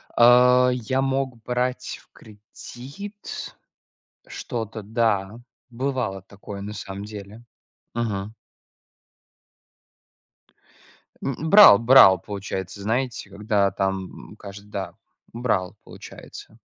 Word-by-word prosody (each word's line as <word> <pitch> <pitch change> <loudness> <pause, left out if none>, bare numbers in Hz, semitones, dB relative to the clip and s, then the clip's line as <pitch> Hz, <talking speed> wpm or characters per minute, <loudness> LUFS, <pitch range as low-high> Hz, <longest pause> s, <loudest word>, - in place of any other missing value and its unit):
А, 125 +1 +6
я 125 +2 -1
мог 135 -3 -2
брать 125 +1 -3
в - - -31
кредит 130 - -10 0.7
что-то. 110 -2 -6
Да, 105 -1 -1 0.3
бывало 125 -6 -3
такое, 100 +1 -10
на 105 +1 -6
самом 100 -1 -7
деле. 105 +2 -10 0.5
Мгм. 110 -2 -3 2.9
М, 145 +4 -3
брал, 200 - +9
брал, 115 -6 +7
получается, 100 0 -6
знаете, 115 0 -2
когда 100 0 0
там, 95 0 -4
м, - - -12
каждый, 100 0 -12
да, 100 -2 -5 0.4
брал, 110 -6 -1
получается. - - -12
110 Hz, 95 wpm, -23 LUFS, 100-125 Hz, 2.9 s, брал